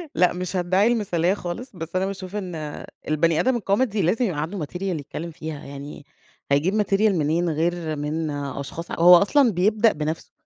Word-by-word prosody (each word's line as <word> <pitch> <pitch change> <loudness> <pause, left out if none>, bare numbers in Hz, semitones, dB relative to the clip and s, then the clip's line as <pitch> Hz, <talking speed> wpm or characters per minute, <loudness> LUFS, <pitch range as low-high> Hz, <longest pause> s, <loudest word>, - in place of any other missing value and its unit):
لأ 180 -1 +4
مش 180 +1 -4
هادّعي 185 +3 +2
المثاليّة 190 -7 +1
خالص، 200 +5 -6
بس 165 0 -7
أنا 185 - +1
باشوف 195 0 -6
إن 170 -7 -5 0.2
البني 155 +1 +2
آدم 255 +8 +2
الكوميدي 215 0 +1
لازم 195 +9 +2
يبقى 165 -9 -2
عنده 165 +1 -3
material 180 +5 -9
يتكلّم 170 -2 -4
فيها، 160 -2 -7
يعني 140 +1 -9 0.5
هيجيب 180 +10 +2
material 195 0 0
منين 165 +2 +1
غير 160 0 -1
من 150 +2 -2
أشخاص 140 +3 -5
هو 175 +2 +7
أصلًا 240 - +4
بيبدأ 210 +4 +3
بنَفسه، 155 +1 -4
175 Hz, 165 wpm, -23 LUFS, 155-195 Hz, 0.5 s, هو